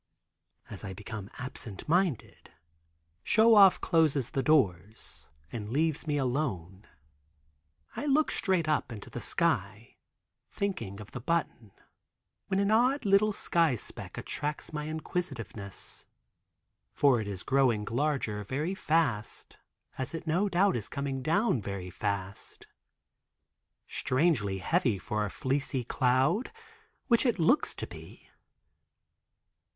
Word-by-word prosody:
As - - -8
I 95 -2 -5
become 105 0 -7
absent 125 -6 -7
minded, 175 - 0 0.7
Show 225 - +5
Off 195 -3 +7
closes 155 -7 +2
the 135 - 0
doors 110 - 0 0.2
and 105 -2 -5
leaves 155 +4 0
me 145 -1 +1
alone." 115 - -2 1.1
I 295 - -3
look 295 +2 +3
straight 185 -5 +1
up 150 -5 0
into 105 -3 -9
the - - -6
sky, - - -1 0.5
thinking 115 - -3
of 105 - -10
the 125 - -6
button, 130 -7 -2 0.8
when 190 0 0
an 200 +1 +2
odd 250 +4 +3
little 200 +2 +4
sky 165 -7 +2
speck - - -7
attracts 150 +2 -4
my 150 0 -3
inquisitiveness, 140 - -5 0.9
for 135 -5 +4
it 105 - -5
is 95 -2 -5
growing 130 -6 +2
larger 120 -4 -1
very 150 - -2
last, 135 -10 0 0.4
as 130 +5 -2
it 165 - -6
no 180 +6 +1
doubt 190 0 +3
is 110 -4 -3
coming 140 -1 -3
down 165 - +1
very 95 -2 -5
fast. 100 0 -4 1.2
Strangely 130 - +1
heavy 120 - +1
for 105 +3 -2
a - - -4
fleecy 135 +1 -1
cloud, 130 - +1 0.5
which 235 -3 +4
it 245 -4 +1
looks 185 - +2
to - - -4
be. - - -13
140 Hz, 125 wpm, -30 LUFS, 105-170 Hz, 1.2 s, Off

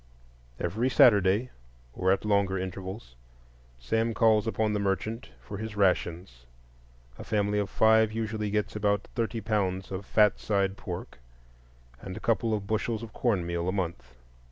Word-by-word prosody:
Every 110 +9 0
Saturday, 105 0 +4 0.4
or 95 +6 +1
at 100 - 0
longer 100 -2 +2
intervals, 95 - -6 0.6
Sam 110 - 0
calls 110 -1 +3
upon 110 -1 0
the 105 - 0
merchant 100 +5 -2
for 100 - -8
his 110 -1 -6
"rations"; 85 -9 0 0.7
a - - -6
family 105 -1 0
of 100 -2 -2
five 110 0 +4
usually 110 -1 -3
gets 105 +1 -1
about 100 -1 0
thirty 115 -1 -2
pounds 95 -3 -1
of 95 +1 -4
fat 105 -2 +3
side 100 -2 0
pork 90 - -7 0.8
and 95 -1 -7
a - - -5
couple 115 0 +1
of 105 -2 -1
bushels 110 +2 -2
of 110 - -9
cornmeal 85 -6 0
a - - +1
month. 90 -9 -4
105 Hz, 150 wpm, -28 LUFS, 95-110 Hz, 0.8 s, Saturday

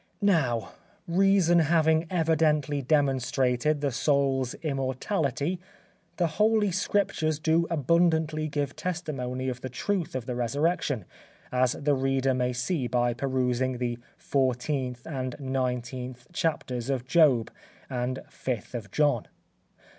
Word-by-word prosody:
Now, 135 - +2 0.4
reason 180 -1 +4
having 160 0 +3
evidently 155 -4 +2
demonstrated 135 0 +1
the 140 -1 0
soul's 135 -1 +1
immortality, 140 - -1 0.6
the 175 - +2 0.2
Holy 215 -2 +4
Scriptures 180 -4 0
do 160 +2 +2
abundantly 160 0 +2
give 145 -2 -2
testimony 135 -8 -3
of 130 -1 -3
the 130 - -5
truth 180 +7 -2
of 130 -3 -3
the 125 - -3
resurrection, 140 - 0 0.5
as 125 -1 +2
the 145 0 0
reader 135 0 +1
may 125 0 0
see 125 +3 -1
by 120 0 +1
perusing 130 0 0
the 120 -1 -2 0.2
14th 130 -1 -1
and 130 -5 -4
19th 125 0 -3
chapters 130 -7 -2
of 130 -3 -1
Job 130 -7 +4 0.4
and 125 +1 -2
5th 125 -4 -4
of 115 -5 -5
John. 145 -1 +1
135 Hz, 115 wpm, -27 LUFS, 125-160 Hz, 0.6 s, reason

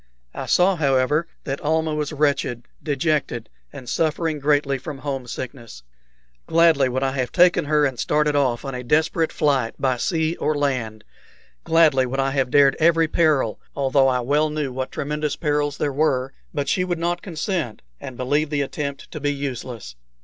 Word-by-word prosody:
I - - -6
saw, 185 +1 +3
however, 140 +2 +2 0.2
that 135 0 -4
Almah 160 +1 0
was 150 0 -2
wretched, 140 -5 0 0.2
dejected, 145 -6 -1 0.2
and 135 -3 -10
suffering 160 +2 0
greatly 145 -1 +1
from 145 +2 -7
home 135 -2 -4
sickness. 120 - -8 0.6
Gladly 160 -5 +4
would 130 +2 -1
I 135 - +1
have 130 -2 -2
taken 180 -2 +4
her 150 0 +3
and 130 -4 -2
started 150 0 +1
off 130 -3 +1
on 135 - -4
a 125 0 -5
desperate 160 +4 +1
flight 135 -6 0
by 130 -2 0
sea 160 - 0
or 155 - 0
land 125 -7 -2 0.6
gladly 155 -6 +4
would 135 +2 -3
I 135 0 +1
have 135 -2 0
dared 140 0 +5
every 165 0 +4
peril, 150 -9 +1 0.2
although 135 -1 +3
I 125 -1 +1
well 145 +5 +1
knew 150 -4 -3
what 130 0 -4
tremendous 150 +1 -2
perils 145 -2 -1
there 145 -2 -1
were; 135 -3 0 0.2
but 145 -2 -3
she 180 - +1
would 175 -2 -2
not 175 +1 -1
consent, 165 - -3 0.2
and 125 - -8
believed 145 +4 0
the 145 -2 0
attempt 140 0 -5
to 155 - -6
be 145 0 0
useless. 125 - -5
145 Hz, 175 wpm, -22 LUFS, 130-155 Hz, 0.6 s, dared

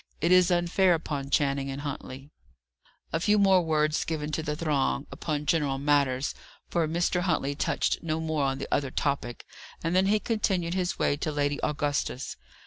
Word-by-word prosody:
It 170 +3 +1
is 185 0 +6
unfair 175 +1 +3
upon 145 -4 -4
Channing 140 -1 +1
and 135 +1 -5
Huntley." 140 -1 -7 0.8
A 165 - +1
few 210 +5 +3
more 195 -2 +5
words 155 -1 +1
given 155 -2 -3
to 160 - -1
the 150 -1 -3
throng, 145 -3 0
upon 150 -2 -3
general 145 -3 +1
matters 140 -2 +1 0.4
for 170 -2 +1
Mr. 175 +2 0
Huntley 160 -6 0
touched 140 - 0
no 160 -1 -2
more 160 -2 -1
on 135 0 0
the 135 - -5
other 140 -2 +1
topic 135 -3 -2 0.4
and 165 +1 0
then 190 +1 +4
he 210 +2 +3
continued 190 -7 0
his 185 -1 -1
way 145 - +1
to 155 - -2
Lady 145 0 0
Augusta's. 145 -3 -1
155 Hz, 175 wpm, -27 LUFS, 140-175 Hz, 0.8 s, is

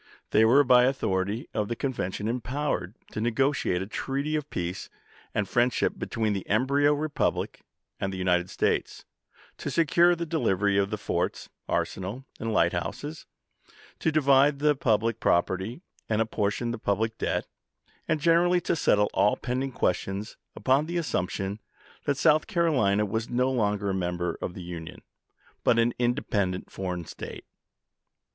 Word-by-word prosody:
They 110 - +5
were 135 +6 +6
by 125 -2 +6
authority 110 -4 -1
of 105 -2 -1
the 120 - -2
convention 110 -6 -3
empowered 120 -5 -2 0.2
to 105 - -4
negotiate 120 -5 +1
a - - -5
treaty 140 +8 -2
of 150 -1 -3
peace 90 +2 -4 0.5
and 100 -2 0
friendship 120 +3 +2
between 110 -2 -1
the 95 -2 -5
embryo 140 +7 +3
republic 150 0 -1 0.4
and 95 - -1
the 95 - -5
United 90 -1 +1
States; - - -1 0.5
to - - -3
secure 170 +2 +4
the 170 0 -3
delivery 100 - +1
of 100 0 +2
the - - -2
forts, - - -2 0.2
arsenal, 100 +8 -2
and 115 0 -2
light 85 -5 +3
houses; 145 - -5 0.7
to 160 - +1
divide 140 -1 +4
the 150 +1 +3
public 115 -2 +1
property 95 - 0 0.3
and 110 -1 +1
appor 110 -2 +1
tion 120 +3 -3
the 120 - -4
public 110 +2 0
debt, - - -1 0.6
and 155 -1 +1
generally 170 +3 +4
to 170 - 0
settle 105 -9 +3
all 100 +2 +3
pending 130 +2 -2
questions, 95 0 -2 0.2
upon 135 +4 +2
the 175 +1 -2
assumption 95 - -2 0.5
that 140 -2 +1
South 155 0 +4
Carolina 140 - +2
was 110 +3 -3
no 125 +2 +1
longer 105 -5 0
a - - -1
member 90 -2 -2
of 90 - -4
the - - -7
i.',p'.iii?' - - -8
Union, 85 +1 -7 0.6
but - - +4
an 115 +1 +3
independent 100 -6 -1
foreign 90 -3 -4
State. - - -8
115 Hz, 155 wpm, -27 LUFS, 95-140 Hz, 0.7 s, were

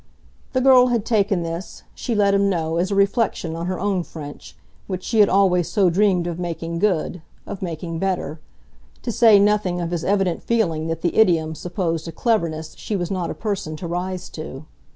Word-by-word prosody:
The 255 - +2
girl 255 -1 +7
had 235 -4 0
taken 200 -6 +1
this, 165 +3 -6
she 240 - -3
let 200 -1 +3
him 200 0 +3
know, 165 -3 -1
as 180 +2 +1
a 200 - -1
reflection 200 -4 +1
on 170 +1 -4
her 185 0 -2
own 195 -2 0
French, 150 -4 -10 0.3
which 185 -2 -4
she 225 - 0
had 205 - +6
always 185 -3 +3
so 190 -3 +3
dreamed 185 -1 +2
of 175 0 -4
making 170 -1 -4
good, 180 -3 0 0.2
of 195 - -7
making 165 -2 -4
better; 185 -4 -2 0.6
to 240 - -2
say 225 -2 +6
nothing 200 -3 +2
of 170 -1 -3
his 175 -2 -2
evident 195 -3 +1
feeling 165 -9 0
that 165 0 -4
the 175 - 0
idiom 165 -7 +3
supposed 170 -1 -3
a - - -4
cleverness 165 -6 -1
she 215 - -3
was 175 -2 -2
not 185 -3 -2
a - - -4
person 200 -7 -3
to 155 - -7
rise 180 +2 -3
to. 155 -2 -8
180 Hz, 195 wpm, -22 LUFS, 165-205 Hz, 0.6 s, girl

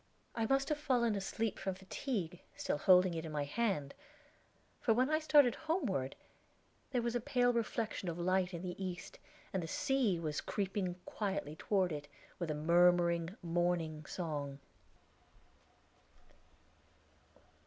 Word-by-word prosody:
I 225 -1 0
must 270 +1 +2
have 300 -1 0
fallen 245 -6 +2
asleep 210 +2 -2
from 190 -1 -2
fatigue, 190 - -3 0.2
still 150 - -1
holding 180 +1 +6
it 165 -1 -3
in 160 - -6
my 150 -1 -1
hand; 145 -4 -1 0.9
for 225 -4 +3
when 255 +5 +2
I 310 - +3
started 295 -5 +5
homeward, 315 - -1 0.7
there 245 -3 0
was 235 -1 0
a 245 - +1
pale 245 +1 +2
reflection 225 -4 -1
of 165 - -4
light 185 +1 +1
in 170 -1 -6
the 180 +1 -4
east, 180 -2 -6 0.3
and 190 - 0
the 165 - -4
sea 245 -1 +1
was 155 -3 -2
creeping 195 -3 -2
quietly 195 -8 -3
toward 185 +1 +1
it 145 -1 -5 0.3
with 175 -3 -2
a 155 - 0
murmuring 170 +3 +3
morning 170 -2 0
song. 145 -5 -3
185 Hz, 140 wpm, -35 LUFS, 165-230 Hz, 0.9 s, holding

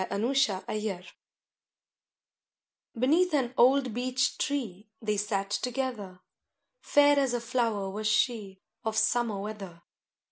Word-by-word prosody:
A - - -2
FOREST 265 +4 +2 0.2
IDYL 210 -4 -3
I 225 - -24
Beneath 315 +7 +3
an 255 -3 0
old 260 -1 +4
beech 255 +2 0
tree 220 -8 -3
They 210 -2 -1
sat 200 -1 -2
together, 235 -7 -3 0.6
Fair 290 -8 +4
as 265 -3 +1
a - - -1
flower 230 -4 -1
was 210 +3 -3
she 215 -3 0 0.2
Of 220 -1 -2
summer 235 -5 +1
weather. 195 -5 -8
225 Hz, 120 wpm, -28 LUFS, 205-255 Hz, 0.6 s, old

